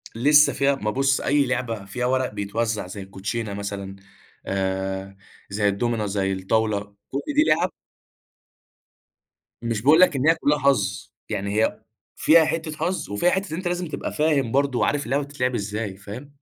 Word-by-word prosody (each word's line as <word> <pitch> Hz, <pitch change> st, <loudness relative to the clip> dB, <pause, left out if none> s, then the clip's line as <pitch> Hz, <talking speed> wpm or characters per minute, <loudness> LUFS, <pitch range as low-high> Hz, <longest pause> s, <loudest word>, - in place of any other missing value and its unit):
لسه 145 Hz, +5 st, +5 dB
فيها 140 Hz, 0 st, +2 dB
ما 105 Hz, -5 st, -2 dB
بُصّ 135 Hz, +3 st, +1 dB
أي 145 Hz, -1 st, +2 dB
لعبة 120 Hz, -5 st, -2 dB
فيها 125 Hz, +5 st, -3 dB
ورق 130 Hz, -2 st, 0 dB
بيتوزع 105 Hz, 0 st, -2 dB
زي 100 Hz, +2 st, -7 dB
الكوتشينة 100 Hz, +3 st, -4 dB
مثلًا، 100 Hz, -1 st, -5 dB, 0.5 s
آآ، 95 Hz, 0 st, -2 dB, 0.3 s
زي 105 Hz, +1 st, 0 dB
الدُومنة، 110 Hz, +2 st, 0 dB
زي 95 Hz, -1 st, -1 dB
الطاولة، 100 Hz, +1 st, -1 dB, 0.2 s
كُلّ 140 Hz, +1 st, -2 dB
دي 300 Hz, -, +6 dB
لِعَب -, -, +2 dB, 1.9 s
مش 115 Hz, -3 st, -1 dB
باقول 150 Hz, +6 st, +6 dB
لك 185 Hz, -6 st, +6 dB
إن 135 Hz, +3 st, +1 dB
هي 165 Hz, -, +6 dB
كلّها 150 Hz, -2 st, +1 dB
حظ، 105 Hz, -8 st, +1 dB, 0.2 s
يعني 100 Hz, +2 st, -1 dB
هي -, -, -2 dB, 0.3 s
فيها 160 Hz, 0 st, +5 dB
حتّة 160 Hz, 0 st, -2 dB
حظ 175 Hz, -, -2 dB
وفيها 105 Hz, +13 st, +2 dB
حتّة 190 Hz, -2 st, -1 dB
إن 160 Hz, -, -3 dB
أنت 185 Hz, -1 st, -3 dB
لازم 175 Hz, -1 st, -2 dB
تبقى -, -, -5 dB
فاهم 150 Hz, -6 st, +1 dB
برضو 140 Hz, -2 st, +1 dB
وعارف 145 Hz, -1 st, +1 dB
اللعبة 140 Hz, +4 st, 0 dB
بتتلعب 130 Hz, -3 st, -2 dB
إزاي، 105 Hz, -2 st, -3 dB
فاهم؟ 105 Hz, +8 st, -9 dB
115 Hz, 165 wpm, -24 LUFS, 100-145 Hz, 1.9 s, دي